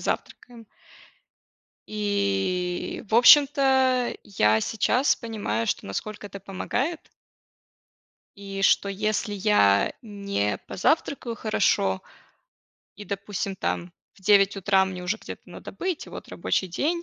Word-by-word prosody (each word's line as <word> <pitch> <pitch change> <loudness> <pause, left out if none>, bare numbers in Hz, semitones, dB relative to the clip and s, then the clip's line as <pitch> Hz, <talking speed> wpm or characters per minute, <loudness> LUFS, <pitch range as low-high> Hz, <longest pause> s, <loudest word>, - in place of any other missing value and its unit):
завтракаем. 235 -2 -5 1.3
И, 195 -4 -1
в 220 - -2
общем-то, 265 -1 +5
я 110 - +2
сейчас 245 - +1
понимаю, 205 - -3
что - - -2
насколько 210 - -5
это 200 - -9
помогает 240 - -3 1.3
и 195 -1 -6
что 200 - +3
если 210 +2 -1
я 185 - +3
не 200 - -2
позавтракаю 260 - 0
хорошо 100 - +1 0.9
и, 205 - -9
допустим, 200 0 -4
там 175 -2 -3 0.2
в - - -22
9 200 0 +4
утра 190 0 +3
мне 185 -1 -6
уже 180 +5 -1
где-то - - -10
надо - - -10
быть, 365 -4 -4
вот - - -10
рабочий 190 - -1
день, 320 - -1
200 Hz, 115 wpm, -25 LUFS, 190-230 Hz, 1.3 s, общем-то